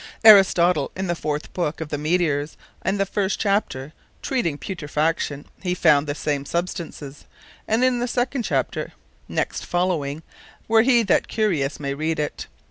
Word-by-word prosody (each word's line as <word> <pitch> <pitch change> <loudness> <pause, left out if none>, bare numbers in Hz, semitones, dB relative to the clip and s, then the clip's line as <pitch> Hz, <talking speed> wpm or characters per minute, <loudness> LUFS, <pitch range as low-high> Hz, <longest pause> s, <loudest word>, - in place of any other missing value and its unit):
Aristotle 180 -7 +6
in 190 - -3
the 175 - 0
fourth 150 -3 -4
Book 165 -4 -2
of 160 -2 -5
the 145 - -2
Meteors 155 -2 0 0.2
and 195 +1 -1
the 195 - +2
first 195 0 -1
Chapter, 195 -9 -1 0.3
treating 245 - 0
of - - -13
Putrefaction, 150 -4 -2 0.2
he 180 -2 -1
found 150 -4 +4
the 145 - -2
same 145 -2 -2
substances; 160 -3 -5 0.4
and 225 +3 +2
in 255 -1 +3
the 245 - -1
second 245 +2 -1
Chapter - - -2 0.3
next - - -2
following, 165 -4 -1 0.4
where 225 0 +5
he 240 0 +4
that 195 - +3
is - - -9
curious 160 -10 0
may 140 -1 -2
read 155 +3 -2
it. 150 - -3
170 Hz, 165 wpm, -23 LUFS, 150-200 Hz, 0.4 s, Aristotle